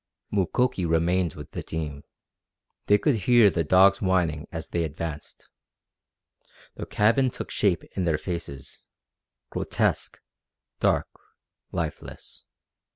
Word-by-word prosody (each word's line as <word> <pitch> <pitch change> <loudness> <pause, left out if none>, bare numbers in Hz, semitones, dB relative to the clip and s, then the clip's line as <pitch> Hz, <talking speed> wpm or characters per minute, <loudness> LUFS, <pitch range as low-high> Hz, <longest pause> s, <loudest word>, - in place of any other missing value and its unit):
Mukoki 100 +2 +1
remained 85 +1 +1
with 75 - -10
the - - -5
team. 75 -3 -5 0.8
They 105 - +6
could 145 +7 +2
hear 110 +1 +5
the 85 0 0
dogs 95 +5 +5
whining 85 -5 0
as 80 -1 -6
they 85 - -1
advanced. 80 0 -6 1.3
The - - -7
cabin 115 +5 +3
took - - -7
shape 95 -4 +1
in 95 - -1
their 80 -2 +2
faces 75 -6 -6 0.7
grotesque, - - -1 0.6
dark, - - +2 0.7
lifeless. - - -6
85 Hz, 110 wpm, -26 LUFS, 80-100 Hz, 1.3 s, They